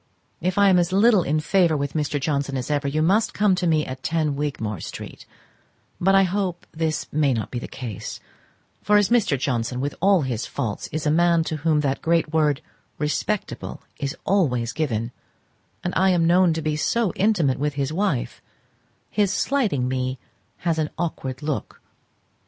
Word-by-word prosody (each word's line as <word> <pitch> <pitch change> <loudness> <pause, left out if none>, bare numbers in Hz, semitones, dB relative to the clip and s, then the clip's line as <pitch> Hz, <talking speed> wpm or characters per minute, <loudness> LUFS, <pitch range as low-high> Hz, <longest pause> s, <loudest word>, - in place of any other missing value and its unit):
If 185 +2 -1
I 200 -1 +6
am 180 -1 +5
as 175 0 +1
little 205 +1 +5
in 155 -1 0
favour 170 0 +2
with 140 0 -3
Mr. 150 -2 -1
Johnson 140 -1 -1
as 130 +3 -3
ever, 145 -1 0
you 155 +3 0
must 210 +6 +2
come 205 -2 +3
to 180 -1 0
me 155 -2 +2
at 130 0 -7
10 155 -2 0
Wigmore 130 - -3
street; - - -8 0.7
but 195 +2 +3
I 195 - +6
hope 185 -2 -2
this 160 -1 -1
may 145 -4 +2
not 110 - -4
be 120 - -3
the - - -7
case, 115 -7 -6 0.6
for 210 0 +4
as 205 -2 +3
Mr. 230 - +3
Johnson, 125 -2 -1
with 140 +2 -2
all 195 -3 +4
his 125 -4 -3
faults, 115 -8 -4
is 155 0 -3
a 150 - +3
man 170 +1 +3
to 160 -1 -3
whom 155 0 +2
that 140 -2 -1
great 165 -1 +1
word 150 -2 +2 0.4
"respectable" 170 +7 -3 0.2
is 140 -1 -3
always 125 - +1
given, 120 -7 -2 0.7
and 175 - -2
I 190 +1 +4
am 175 -3 +3
known 175 +1 +5
to 160 0 -3
be 155 -1 0
so 210 +5 0
intimate 180 -11 +2
with 145 0 -1
his 140 +1 -1
wife, 165 -9 -1 0.7
his 205 -2 +2
slighting 210 - 0
me 130 0 -2 0.5
has 165 -2 +1
an 155 -1 0
awkward 150 -5 -4
look. 150 -2 -3
155 Hz, 180 wpm, -23 LUFS, 140-180 Hz, 0.7 s, I